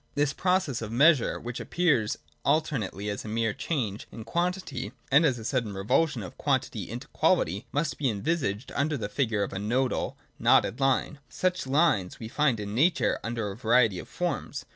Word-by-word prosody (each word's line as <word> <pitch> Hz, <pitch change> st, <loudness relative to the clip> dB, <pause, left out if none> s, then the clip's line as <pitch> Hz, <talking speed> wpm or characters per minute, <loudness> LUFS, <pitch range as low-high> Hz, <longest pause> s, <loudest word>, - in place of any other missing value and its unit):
This 145 Hz, 0 st, +1 dB
process 180 Hz, -9 st, 0 dB
of 110 Hz, -1 st, -5 dB
measure, 140 Hz, +2 st, +4 dB
which 120 Hz, 0 st, -6 dB
appears 145 Hz, -12 st, +1 dB, 0.3 s
alternately 135 Hz, -, 0 dB
as 100 Hz, -1 st, -3 dB
a -, -, -8 dB
mere 110 Hz, 0 st, 0 dB
change 110 Hz, -, -3 dB
in 115 Hz, -, -8 dB
quantity, 170 Hz, -, -2 dB, 0.2 s
and 145 Hz, +4 st, +6 dB
then -, -, +6 dB
as 125 Hz, -, -3 dB
a 110 Hz, -, -8 dB
sudden 120 Hz, -5 st, -1 dB
revulsion 115 Hz, +5 st, +1 dB
of 90 Hz, -, -10 dB
quantity -, -, -1 dB
into -, -, -6 dB
quality, 100 Hz, -, +1 dB
maybe 145 Hz, -2 st, 0 dB
envisaged 110 Hz, -1 st, -2 dB
under 145 Hz, +1 st, 0 dB
the 105 Hz, -4 st, -4 dB
figure 110 Hz, -4 st, 0 dB
of 100 Hz, -, -5 dB
a 95 Hz, -, -3 dB
nodal 125 Hz, +5 st, -1 dB, 0.2 s
(knotted) 120 Hz, -, +3 dB
line. 135 Hz, +2 st, +1 dB
Such 185 Hz, -5 st, -1 dB
lines 130 Hz, -, +2 dB
we 110 Hz, -, -6 dB
find 135 Hz, -3 st, +1 dB
in 105 Hz, -1 st, -5 dB
Nature 160 Hz, +9 st, +2 dB
under 115 Hz, -3 st, -2 dB
a -, -, -7 dB
variety 115 Hz, -3 st, +3 dB
of -, -, -10 dB
forms. -, -, -3 dB
125 Hz, 180 wpm, -28 LUFS, 105-150 Hz, 0.3 s, and